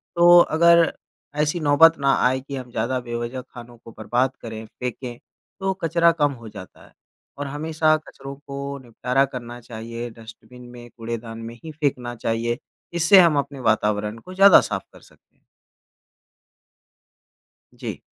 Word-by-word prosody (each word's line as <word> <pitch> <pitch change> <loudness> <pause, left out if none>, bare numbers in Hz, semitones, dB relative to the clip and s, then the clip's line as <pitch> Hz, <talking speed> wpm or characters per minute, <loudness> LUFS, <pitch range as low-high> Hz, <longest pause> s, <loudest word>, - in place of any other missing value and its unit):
तो 175 0 +7
अगर 170 0 +5 0.5
ऐसी 150 +3 0
नौबत 160 +2 +5
ना 140 -1 +3
आए 130 +1 0
कि 140 +1 -8
हम 125 -2 -8
ज़्यादा 120 +3 -1
बेवज़ह 120 +1 -5
ख़ानों 120 -1 -13
को 115 0 -14
बर्बाद 125 +4 0
करें, 110 -1 -7
फ़ेंके 125 +1 -6 0.4
तो 190 0 0
कचरा 170 +1 +4
कम 145 -1 +3
हो 115 - -9
जाता 100 -3 -12
है - - -22 0.4
और 145 0 -4
हमेशा 155 +2 +1
कचरों 140 -3 -11
को 140 0 -7
निपटारा 125 +3 0
करना 120 -1 -7
चाहिए, 115 +1 -7
डस्टबिन 115 +2 -14
में 120 -1 -12
कूड़ेदान 115 0 -6
में 115 +1 -8
ही 160 - -7
फ़ेंकना 130 -5 -2
चाहिए। 115 +1 -2 0.4
इससे 170 +3 +6
हम 170 -5 +5
अपने 140 -1 -5
वातावरण 105 -1 0
को 185 +9 -12
ज़्यादा 195 +1 +8
साफ़ - - -4
कर - - -16
सकते - - -24
हैं। - - -40 2.3
जी। - - -7
130 Hz, 150 wpm, -22 LUFS, 115-155 Hz, 2.3 s, ज़्यादा